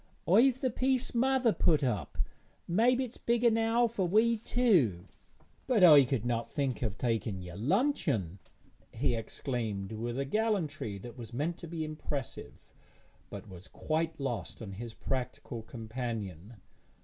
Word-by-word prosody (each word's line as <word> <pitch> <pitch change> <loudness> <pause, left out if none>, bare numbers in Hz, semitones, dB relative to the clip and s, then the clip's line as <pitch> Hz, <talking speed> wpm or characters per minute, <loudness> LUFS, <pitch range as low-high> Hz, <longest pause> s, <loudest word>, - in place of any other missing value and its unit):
'I've 245 +8 +5
the 260 - +1
piece 260 +1 0
mother 255 -1 +3
put 155 -3 +2
up, 120 -7 -2 0.5
mebbe 235 +8 +3
it's 255 -3 -3
big 235 0 0
enou' 225 +1 +3
for 210 -5 -1
we 220 +5 +4
two.' 185 - +2 0.6
'But 235 -7 +3
I 150 -6 +9
could 120 -3 -1
not 120 -1 -1
think 135 -4 -2
of 110 -5 -2
taking 110 -5 -1
your 90 -1 -8
luncheon,' 140 - 0 0.5
he - - 0
exclaimed, 115 -3 -3
with 120 +2 -4
a 135 - -1
gallantry 160 - -1
that 120 +5 -10
was 115 -1 -8
meant 160 +7 -2
to 170 - -8
be 160 -1 -3
impressive, 150 -4 -5 0.7
but 100 +2 -8
was 95 -1 -11
quite 160 - -2
lost 120 -8 -4
on 105 -4 -7
his 115 +4 -7
practical 125 -2 -4
companion. 110 - -6
140 Hz, 145 wpm, -31 LUFS, -, 0.7 s, I